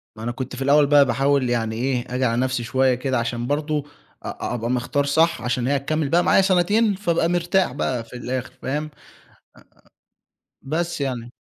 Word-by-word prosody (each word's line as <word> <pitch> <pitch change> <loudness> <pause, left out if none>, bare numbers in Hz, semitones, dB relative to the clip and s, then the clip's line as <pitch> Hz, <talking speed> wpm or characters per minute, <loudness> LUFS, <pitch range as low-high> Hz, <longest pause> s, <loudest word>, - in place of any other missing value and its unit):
ما 110 - -9
أنا 120 - -2
كنت 130 +1 -6
في 130 - -8
الأول 145 +2 +4
بقى 145 0 +6
باحاول 135 +1 +1
يعني 115 -2 -1
إيه، 125 +1 -2
آجي 130 0 +1
على 115 0 +1
نفسي 130 -2 -1
شوية 130 +1 +2
كده 130 0 -1
عشان 120 0 -3
برضه 150 +1 -1 0.4
أ - - -6
أ - - -4
أبقى 120 -1 -3
مختار 125 +3 0
صح 160 0 +2
عشان 125 +1 -1
هي 140 - +2
هتكمّل 150 +2 -1
بقى 175 +4 +3
معايا 185 - +4
سَنتين، 195 +3 +2
فابقى 170 -4 0
مرتاح 175 -2 +1
بقى 125 -3 -2
في 115 - -13
الآخِر، 125 +1 -4
فاهم؟ 145 +3 -2
آآ 155 - -8 1.8
بس 170 0 -2
يعني. 120 -3 -3
135 Hz, 190 wpm, -22 LUFS, 125-155 Hz, 1.8 s, بقى